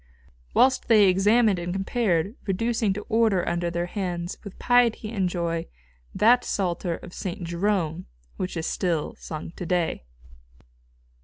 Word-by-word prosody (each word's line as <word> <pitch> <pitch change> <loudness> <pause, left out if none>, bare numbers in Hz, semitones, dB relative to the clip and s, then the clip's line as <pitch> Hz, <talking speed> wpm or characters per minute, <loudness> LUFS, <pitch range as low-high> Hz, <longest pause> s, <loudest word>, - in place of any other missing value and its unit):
whilst 260 0 +4
they 215 -4 +6
examined 205 +2 +4
and 175 +1 -4
compared, 195 -1 0
reducing 225 +2 0
to 205 +2 -4
order 220 -5 +2
under 170 0 0
their 170 0 -2
hands, 175 -2 -4
with 200 - -10
piety 240 -3 +2
and 190 -5 0
joy, 170 -1 -2 0.5
that 245 +3 +5
Psalter 175 -2 -1
of 175 - -11
St. 185 0 -5
Jerome 170 - -1 0.3
which 185 -1 -4
is 160 - -2
still 170 -6 -1
sung 155 0 -7
to 180 - -5
day. 175 - 0
185 Hz, 140 wpm, -25 LUFS, 170-215 Hz, 0.5 s, they